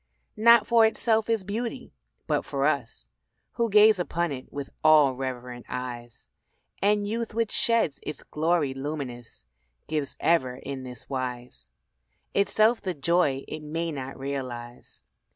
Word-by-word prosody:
Not 235 0 +6
for 235 -1 +5
itself 220 0 +2
is 225 -4 +1
beauty, 230 +6 -5 0.3
but - - 0
for - - -2
us - - -2 0.4
Who 235 -1 -1
gaze 210 -1 +6
upon 170 -1 -1
it 130 -2 -7
with 140 -1 -6
all 155 -4 +6
reverent 125 -2 -6
eyes; 120 -2 -6 0.5
And 205 0 +2
youth 230 +1 -3
which 230 -1 0
sheds 230 - +1
its 150 - -5
glory 155 -3 0
luminous, 135 - -6 0.4
Gives 150 -3 -2
ever 130 -7 +2
in 135 +1 -6
this 125 -2 -9
wise: 125 -2 -5 0.6
Itself 215 +3 +3
the 185 -3 -3
joy 140 -2 +1
it 155 - -6
may 165 +2 -3
not 135 -2 -6
realise. 130 -3 -6
150 Hz, 135 wpm, -26 LUFS, 130-210 Hz, 0.6 s, Not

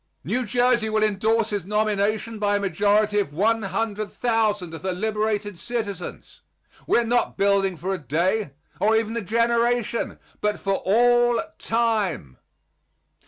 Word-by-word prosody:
New 250 -2 -2
Jersey 245 0 +2
will 215 0 +1
indorse 215 +2 +1
his 200 -4 -3
nomination 215 +1 0
by 205 -1 +1
a - - +1
majority 205 +2 +2
of 145 -8 -3
100,000 215 -1 0
of 160 - -7
her 185 -1 -2
liberated 210 -1 -2
citizens. 205 -6 -5 0.5
We - - +3
are 235 - +3
not 240 +1 0
building 195 -2 +2
for 190 +4 -3
a 190 - -3
day, 170 - 0 0.3
or 220 +2 +3
even 225 0 0
a 235 - -1
generation, 235 +2 0 0.2
but 210 0 0
for 195 -1 0
all 240 +3 +4 0.2
time. 215 - -1
215 Hz, 135 wpm, -24 LUFS, 195-230 Hz, 0.5 s, all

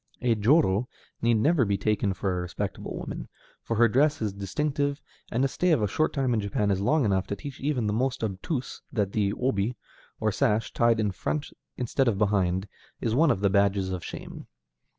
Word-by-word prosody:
A 120 -2 +4
jōrō 115 - +3 0.3
need 115 0 +3
never 145 +6 +3
be 100 -2 +1
taken 100 0 0
for 95 -1 -1
a 90 - -1
respectable 90 0 -4
woman, - - -6 0.3
for 115 - -3
her 120 +2 +5
dress 145 +6 +2
is 105 -3 -2
distinctive, 140 +8 -1 0.3
and 125 +4 +2
a - - +3
stay 175 +7 0
of 125 -9 +3
a - - +2
short 155 +10 +1
time 135 -4 0
in 110 - +1
Japan 100 0 0
is 95 0 0
long 145 +6 +2
enough 95 -2 +1
to 100 - -2
teach 135 +6 -8
even 135 -5 0
the 105 - 0
most 125 +2 -1
obtuse 110 - -3
that 105 -5 0
the 100 -2 +1
obi, 115 -2 0 0.4
or 110 -1 +1
sash, 110 -1 +1
tied 115 -1 +3
in 105 -2 +1
front 145 +10 -3 0.3
instead 125 +2 0
of 110 -4 +2
behind, 95 -2 +1 0.3
is 115 - -1
one 155 +5 +4
of 95 - +1
the 100 - +3
badges 100 -1 +2
of 90 -2 -4
shame. - - -8
110 Hz, 205 wpm, -27 LUFS, 100-130 Hz, 0.4 s, her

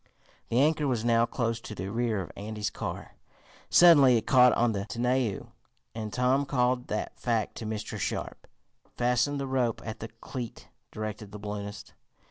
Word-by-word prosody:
The 120 - +2
anchor 150 +1 +3
was 120 -4 -1
now 115 0 +3
close 115 -2 -2
to 110 - -8
the 95 +1 -5
rear 115 -3 0
of - - -11
Andy's 105 +1 -4
car. - - -6 0.6
Suddenly 145 -8 +7
it 110 - -3
caught 125 -1 +6
on 120 0 +2
the 100 -2 -3
tonneau 120 -1 -1 0.4
and 110 -2 -5
Tom 130 +4 +1
called 125 -2 +1
that 105 - -4
fact 115 -4 0
to 110 - -5
Mr. 110 -1 -4
Sharp. - - -4 0.5
"Fasten 125 +4 +1
the 140 - -2
rope 130 -4 0
at 110 -1 -6
the 110 - -5
cleat," 115 +1 -8 0.2
directed 110 -1 -6
the 105 - -7
balloonist. 105 0 -7
115 Hz, 165 wpm, -28 LUFS, 110-125 Hz, 0.6 s, Suddenly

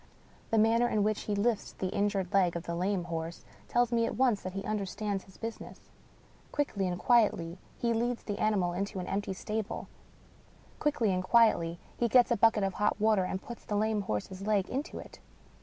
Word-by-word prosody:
The 225 - +2
manner 225 +2 +4
in 210 -3 +1
which 215 0 0
he 210 - -1
lifts 215 +1 0
the 185 - -3
in 205 +1 +2
jured 195 -3 -3
leg 185 -3 +3
of 170 - -3
the 170 - -4
lame 185 +2 0
horse 165 0 -5 0.2
tells 240 0 +2
me 230 -1 +2
at - - -4
once 245 -5 +3
that 185 - -6
he 195 0 -4
under 215 -1 -1
stands 200 0 -3
his 190 - -17
business. 225 0 -8 0.6
Quickly 210 -10 -1
and 175 -1 -2
quietly, 185 -6 +2 0.2
he 235 -1 +1
leads 235 +1 -1
the 205 -2 -4
ani 215 0 +2
mal 175 -2 0
into 195 +2 -3
an 180 - -4
empty 200 0 -2
stable; 215 +3 -4 0.9
quickly 235 -9 +1
and 185 0 -1
quietly, 185 -6 +4 0.2
he 240 - +2
gets 245 +1 +5
a - - +5
bucket 220 -1 +4
of 195 -1 0
hot 210 +1 0
water, 210 -3 +3
and 190 +1 -4
puts 235 - -9
the 210 - -3
lame 215 0 +1
horse's 185 - -4
leg 205 -3 +2
into 280 +5 -3
it. - - -10
205 Hz, 205 wpm, -30 LUFS, 185-225 Hz, 0.9 s, gets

